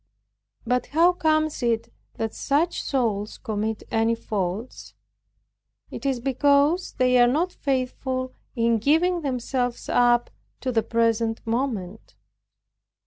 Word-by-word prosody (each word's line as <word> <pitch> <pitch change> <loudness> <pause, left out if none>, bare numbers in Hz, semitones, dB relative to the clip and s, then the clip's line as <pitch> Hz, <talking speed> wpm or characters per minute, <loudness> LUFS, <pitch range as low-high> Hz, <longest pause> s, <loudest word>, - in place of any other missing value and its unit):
But 250 +2 0
how 335 +4 +4
comes 310 -3 +1
it 230 -1 -1 0.2
that 225 -1 -3
such 310 +5 0
souls 220 -6 -1
commit 220 -2 -3
any 225 +1 +2
faults; 210 +1 -4 1.0
because 280 +5 +1
they 250 0 +3
are 240 - +6
not 325 +8 0
faithful, 255 -1 -2 0.2
in 230 -1 +2
giving 335 - +2
themselves 250 -3 -2
up 240 0 +3 0.3
to 260 - -1
the 225 -2 +2
present 230 0 0
moment. 225 -5 -3
250 Hz, 105 wpm, -24 LUFS, 225-280 Hz, 1.0 s, are